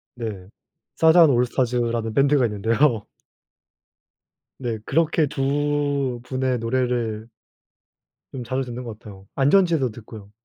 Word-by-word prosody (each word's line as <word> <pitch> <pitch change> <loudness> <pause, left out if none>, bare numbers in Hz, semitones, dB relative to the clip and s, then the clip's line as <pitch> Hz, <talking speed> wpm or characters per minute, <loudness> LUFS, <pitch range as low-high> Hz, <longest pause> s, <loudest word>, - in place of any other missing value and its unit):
네. 105 -6 -6 0.5
사잔 160 0 +6
올스타즈라는 120 -2 0
밴드가 140 0 +3
있는데요. 110 +2 +1 1.5
네. 120 -4 -3
그렇게 160 -1 +1
두 145 -2 -1
분의 130 0 -1
노래를 115 -2 -2 1.1
좀 125 -2 -5
자주 130 +3 -2
듣는 125 0 -7
것 110 -3 -8
같아요. 100 -3 -13
안전지대도 150 - +3
듣고요. 105 -2 -12
125 Hz, 245 characters per minute, -22 LUFS, 115-140 Hz, 1.5 s, 사잔